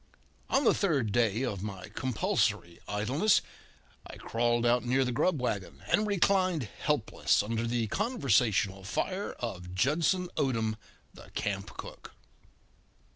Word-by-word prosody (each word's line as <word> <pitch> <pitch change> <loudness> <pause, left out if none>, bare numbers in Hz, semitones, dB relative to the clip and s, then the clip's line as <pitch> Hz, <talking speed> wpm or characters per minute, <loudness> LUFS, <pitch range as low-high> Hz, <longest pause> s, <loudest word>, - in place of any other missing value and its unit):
On 270 - +3
the - - +5
third 145 - +1
day 115 +1 +2
of 100 -7 -3
my 100 -2 -6
compulsory 110 - -1
idleness 130 - +2 0.7
I - - -9
crawled 120 +1 0
out 120 0 +3
near 130 +2 +2
the 125 - -1
grub 150 +6 +1
wagon, 105 -6 -3
and 215 - +3
reclined 185 - +2
helpless - - +1
under 115 +2 -2
the 115 -1 0
conversational 110 - +1
fire 190 - -2
of 90 -6 -6
Judson 165 - +1
Odom, 115 -5 0 0.4
the - - -14
camp 100 -1 -3
cook. - - -10
120 Hz, 130 wpm, -30 LUFS, 105-165 Hz, 0.7 s, the